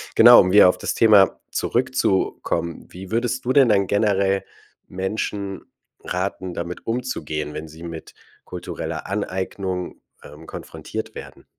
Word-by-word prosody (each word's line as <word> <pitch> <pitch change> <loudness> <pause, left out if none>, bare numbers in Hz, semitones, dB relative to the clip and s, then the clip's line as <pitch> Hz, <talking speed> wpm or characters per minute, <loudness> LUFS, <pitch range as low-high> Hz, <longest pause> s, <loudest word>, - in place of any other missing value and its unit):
Genau, 120 +2 +9
um 90 - +3
wieder 100 -2 +8
auf - - 0
das - - -3
Thema 105 -4 +5
zurückzukommen. 105 -8 -1
Wie 95 +1 -10
würdest 120 +3 -1
du 125 - +1
denn 135 -1 +6
dann 100 -2 +3
generell 100 -1 +1 0.4
Menschen 95 0 -4 0.4
raten, 95 0 -3
damit 85 +1 -6
umzugehen, 115 -11 -3
wenn 80 +1 -7
sie 80 +2 -14
mit 85 -1 -8 0.3
kultureller 90 -1 -6
Aneignung, 95 -2 -4 0.2
ähm, 75 +3 -13
konfrontiert - - -7
werden? - - -10
95 Hz, 130 wpm, -22 LUFS, 90-110 Hz, 0.4 s, Genau